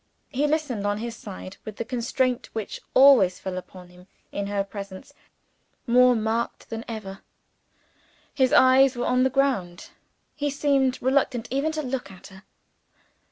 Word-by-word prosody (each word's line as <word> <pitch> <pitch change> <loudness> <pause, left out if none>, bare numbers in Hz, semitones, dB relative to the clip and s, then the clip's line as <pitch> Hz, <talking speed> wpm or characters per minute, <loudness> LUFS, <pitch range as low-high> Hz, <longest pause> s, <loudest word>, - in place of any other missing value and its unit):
He 290 +2 0
listened, 285 -9 -1
on 205 0 0
his 230 +1 -5
side, 195 -3 -9
with 215 -2 -8
the 230 - -4
constraint 250 +1 -1
which 220 -3 -5
always 255 -10 +6
fell 190 -1 -5
upon 185 0 -9
him 180 +1 -18 0.2
in 200 0 -3
her 200 -1 -1
presence 195 -1 -9 0.7
more 250 +1 +5
marked 225 +2 -2
than 225 0 -4
ever. 210 -4 -7 1.1
His 260 -2 +2
eyes 260 +1 +5
were 240 - -2
on 250 0 +2
the 260 - +3
ground. 250 -10 -1 0.4
He 290 -1 -1
seemed 275 -2 +1
reluctant 260 -3 +1
even 280 +4 0
to 310 -1 -3
look 250 -6 -4
at 185 -2 -14
her. 190 0 -14
235 Hz, 155 wpm, -25 LUFS, 200-265 Hz, 1.1 s, always